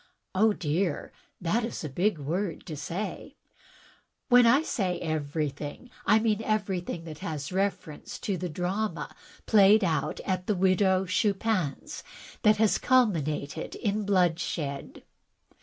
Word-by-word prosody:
"Oh, 215 +4 +4
dear, 170 -2 -1 0.3
that 200 +7 0
is 230 - -4
a - - -2
big 175 +7 0
word 165 +5 -3
to 155 - -6
say." 170 +8 -5 0.9
"When 245 -1 +7
I 275 +6 +5
say 185 - -1
everjrthing, 150 - -3 0.2
I 210 +2 +6
mean 220 -1 +1
everjrthing 190 -6 -2
that 155 -2 -8
has 150 -2 -4
reference 190 -5 -3
to 200 - -1
the 180 0 -4
drama 185 +7 -3 0.3
played 210 0 +6
at 180 +2 -1
the 210 - +2
Widow 190 0 +3
Chupin's 195 -4 -1 0.4
which 215 -2 +5
has 220 -1 +3
culminated 160 - +1
in 210 -1 -1
bloodshed. 170 -7 -1
185 Hz, 125 wpm, -28 LUFS, 160-210 Hz, 0.9 s, When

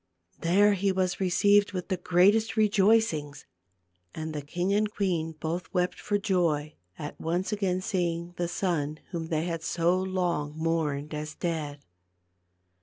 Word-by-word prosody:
There 200 +5 +4
he 200 0 +1
was 185 -1 0
received 200 +2 +3
with 180 +1 -4
the 185 - 0
greatest 200 +5 +3
rejoicings; 200 -8 +2 0.7
and 160 0 -4
the 150 - -3
king 175 +7 -1
and 210 +1 +1
queen 170 -6 -1
both 165 +3 -3
wept 180 0 0
for 205 - 0
joy 170 -7 0 0.2
at 150 - -7
once 175 +5 -1
again 190 -3 0
seeing 175 -2 -2
the 175 0 -1
son 165 -5 -1
whom 165 -3 -3
they 160 0 -1
had 165 -2 -3
so 170 +2 +1
long 175 -5 -1
mourned 155 -3 -1
as 150 0 -5
dead. 150 -4 -3
175 Hz, 145 wpm, -28 LUFS, 160-195 Hz, 0.7 s, There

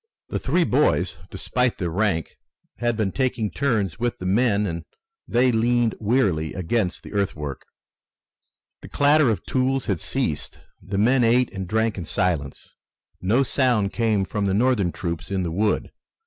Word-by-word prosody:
The - - -2
three 175 - +1
boys, 95 - +1
despite 125 +5 -1
their 85 -4 -2
rank, 95 -3 0 0.4
had 120 -2 0
been 105 -4 0
taking 125 -4 -1
turns 110 - -1
with 120 0 -1
the 90 - -7
men 105 +1 +2
and 85 -3 -4 0.4
they 125 +2 +3
leaned 120 0 +2
wearily 100 -9 +1
against 95 +1 -1
the - - -10
earthwork. 75 -9 -2 1.2
The - - -11
clatter 145 -1 +4
of 110 - -2
tools 130 0 0
had 95 -5 -1
ceased. - - -3 0.2
The 95 +1 -4
men 120 +5 +4
ate 120 +1 +3
and 95 -2 -5
drank 110 0 0
in 85 - -5
silence. 85 -7 -2 0.5
No 110 +9 +3
sound 120 -7 +1
came 110 -4 +1
from 105 0 -2
the 95 -1 +1
Northern 110 -5 +2
troops 85 -2 -5
in 95 -2 -1
the 85 - -2
wood. 105 +5 0
105 Hz, 160 wpm, -23 LUFS, 95-120 Hz, 1.2 s, clatter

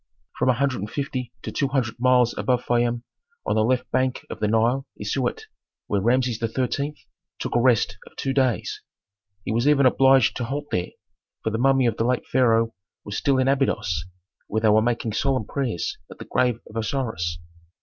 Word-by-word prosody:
From - - +2
a - - +6
hundred 130 +1 0
and 105 +2 -4
fifty 130 -3 -4
to - - -4
two 140 - 0
hundred 130 -4 -1
miles 125 -1 +4
above 125 -1 0
Fayum 120 0 +1 0.4
on - - +1
the 110 - +3
left 125 +2 0
bank 130 0 0
of - - -6
the 105 - +1
Nile 115 +5 +1
is 105 - -3
Siut, 130 -3 -1 0.4
where 100 -1 0
Rameses 120 +1 +1
XIII. 130 +5 -1 0.4
took - - -4
a - - +4
rest 115 -4 +2
of - - -17
two 135 - -2
days. 130 -4 0 0.6
He - - -2
was 120 +4 +1
even 145 -2 +5
obliged 130 -2 +5
to 120 - -2
halt 145 +4 -5
there, 90 0 -1 0.5
for 110 - 0
the 110 - -2
mummy 135 0 +4
of 115 -2 +1
the - - +1
late 125 +1 0
pharaoh 115 -3 +2 0.3
was 105 - -5
still 135 +3 +2
in 130 0 +2
Abydos, 105 - 0 0.4
where 110 +1 -1
they 110 - +4
were 110 +1 +5
making 115 -1 -1
solemn 130 -1 0
prayers 120 - -2
at - - -11
the - - -9
grave 125 -2 +1
of 110 - -9
Osiris. 110 -8 -2
120 Hz, 195 wpm, -24 LUFS, 110-130 Hz, 0.6 s, a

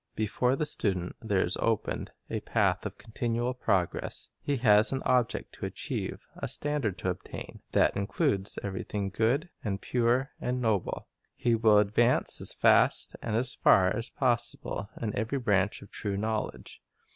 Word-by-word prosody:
Before 125 +4 +1
the 150 - -1
student 95 -10 +2
there 100 -4 +1
is 90 - 0
opened 115 -2 -1 0.2
a - - -3
path - - 0
of - - -11
continual 120 +2 -2
progress. 95 -8 -1
He 145 -1 -1
has 105 -3 +5
an 135 0 -2
object 125 -2 +1
to - - -5
achieve, - - -4
a - - -4
standard 145 -10 0
to - - -1
attain, - - -8
that - - +3
includes 100 - 0
everything 100 0 -3
good, 125 - 0
and 95 -3 -2
pure, 125 +4 +1
and 125 +1 -1
noble. 110 -6 -1 0.3
He 120 - +1
will 110 -2 +5
advance 110 +4 +2
as - - +2
fast - - +3
and 110 -2 -2
as 125 +2 +2
far 95 +2 +4
as 115 +2 -4
possible 120 -5 0
in 110 -3 -3
every 110 +6 -1
branch 105 -6 +1
of 100 - -15
true 100 -2 -2
knowledge. 110 +1 -4
110 Hz, 155 wpm, -29 LUFS, 100-125 Hz, 0.3 s, has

